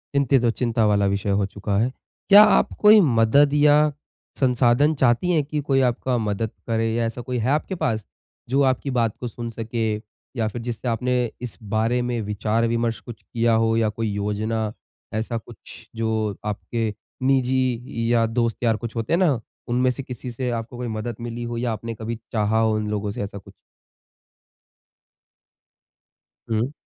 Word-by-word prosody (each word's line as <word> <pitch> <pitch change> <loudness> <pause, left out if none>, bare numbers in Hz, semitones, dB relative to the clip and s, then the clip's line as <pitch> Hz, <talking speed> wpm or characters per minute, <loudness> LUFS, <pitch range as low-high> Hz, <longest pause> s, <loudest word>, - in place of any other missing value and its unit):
चिंतित 135 -2 +3
और 115 - +4
चिंता 115 -2 0
वाला 100 -1 +3
विषय 100 +1 -1
हो 100 0 +2
चुका 100 0 -3
है। 125 +3 +1 0.4
क्या 205 +2 +10
आप - - +3
कोई 210 0 +8
मदद 140 - +4
या 150 0 +5 0.5
संसाधन 130 +3 +3
चाहती 135 +7 +2
हैं 155 -4 +2
कि 150 +1 -3
कोई 135 -2 +2
आपका 125 +1 -2
मदद 110 0 -2 0.2
करे 115 0 +1
या 115 0 0
ऐसा 115 +2 -4
कोई 125 +1 -3
है 120 +3 0
आपके 155 +6 0
पास? 120 - -1 0.4
जो 135 +2 +2
आपकी 130 +1 +1
बात 115 -3 +1
को 125 - -4
सुन 120 0 -6
सके 115 -1 -2 0.4
या 110 -1 +1
फिर 115 +2 -5
जिससे 120 +1 -5
आपने 125 +1 0
इस 115 -8 -7
बारे 115 +3 +1
में 120 -1 -2
विचार-विमर्श 115 +2 0
कुछ 120 -3 -11
किया 115 0 0
हो 115 0 +2
या 110 -1 +2
कोई 115 +1 -3
योजना 105 +2 -2 0.4
ऐसा 115 +2 -2
कुछ 110 - -12
जो 110 -2 -1
आपके 110 +1 -2 0.3
निजी 130 -3 0
या 115 -1 +4
दोस्त 115 0 0
यार 115 -2 +3
कुछ 115 +2 -7
होते 115 +4 -2
हैं 170 - +4
ना 155 -10 +3 0.3
उनमें 125 +2 +2
से 135 - -6
किसी 125 -1 -7
से 125 +1 -3
आपको 115 +1 -5
कोई 125 0 -4
मदद 110 +1 -4
मिली 120 0 -5
हो 120 0 -4
या 120 0 -1
आपने 115 +2 -5
कभी 115 +2 -4 0.2
चाहा 110 0 +1
हो 110 -1 +2
उन 110 0 -2
लोगों 105 -1 -2
से 120 - -5
ऐसा 100 0 -6
कुछ? 100 - -13 3.0
हुँ। 115 +4 0
115 Hz, 175 wpm, -23 LUFS, 110-125 Hz, 3.0 s, क्या